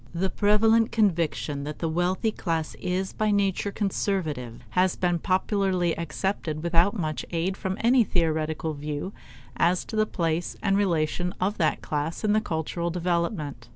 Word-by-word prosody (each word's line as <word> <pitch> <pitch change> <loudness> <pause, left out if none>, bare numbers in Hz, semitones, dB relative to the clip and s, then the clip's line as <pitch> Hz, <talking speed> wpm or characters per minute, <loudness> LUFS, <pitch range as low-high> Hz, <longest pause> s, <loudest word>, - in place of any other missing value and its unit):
The 190 +2 0
prevalent 220 +3 +4
conviction 165 -8 +1
that 150 +1 -5
the 165 - -2
wealthy 180 +7 +1
class 165 -6 -2
is 185 +1 -1
by 215 0 0
nature 200 -1 +1
conservative 175 - -2
has 185 0 +2
been 175 -2 +1
popularly 185 -1 +1
accepted 165 -2 -2
without 170 +5 +3
much 155 -4 -2
aid 175 +3 -1
from 190 -1 -3
any 240 +1 +5
theoretical 160 -3 0
view 150 +5 -4 0.4
as 175 +1 +2
to 220 - -7
the 215 0 +2
place 165 -2 -1
and 195 -1 +3
relation 180 -2 0
of 195 +3 -1
that 155 -3 +1
class 150 +5 -2
in 210 -1 +3
the 215 - +3
cultural 170 0 -2
development. 170 - -2
175 Hz, 155 wpm, -26 LUFS, 160-200 Hz, 0.4 s, any